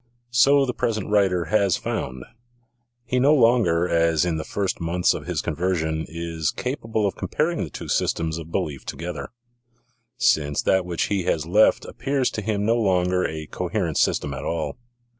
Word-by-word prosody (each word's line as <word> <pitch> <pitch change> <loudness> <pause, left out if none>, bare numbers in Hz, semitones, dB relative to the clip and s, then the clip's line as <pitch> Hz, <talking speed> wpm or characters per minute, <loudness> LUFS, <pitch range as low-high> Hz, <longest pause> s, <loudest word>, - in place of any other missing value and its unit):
So 135 +3 +5
the 125 - -2
pres 115 -2 -1
ent 105 - -5
writer 95 -4 +2
has 100 -4 +3
found. 65 0 -4 0.8
He 125 - 0
no 145 +4 +5
longer, 115 - +3
as 85 -1 +2
in 85 -2 0
the 80 - -3
first 100 +2 -2
months 85 +2 +2
of - - -7
his - - -2
conversion, 80 -2 -1
is 80 -1 -3
capable 115 -4 -2
of 100 - -1
comparing 165 +2 -1
the - - -5
two - - -8
systems 80 -1 0
of 80 0 -10
belief 75 -8 -2
together, 85 -1 -6 0.9
since 75 -2 +2
that 95 -1 +2
which 85 -2 -1
he 100 -3 0
has 80 -3 0
left 105 +6 +4
appears 135 0 -1
to 110 - -4
him 105 -1 -1
no 115 +2 +3
longer 90 -4 +2
a 80 -1 -6
coherent 85 0 -2
system 70 - +1
at 70 +1 -6
all. 80 0 -2
90 Hz, 175 wpm, -23 LUFS, 80-110 Hz, 0.9 s, So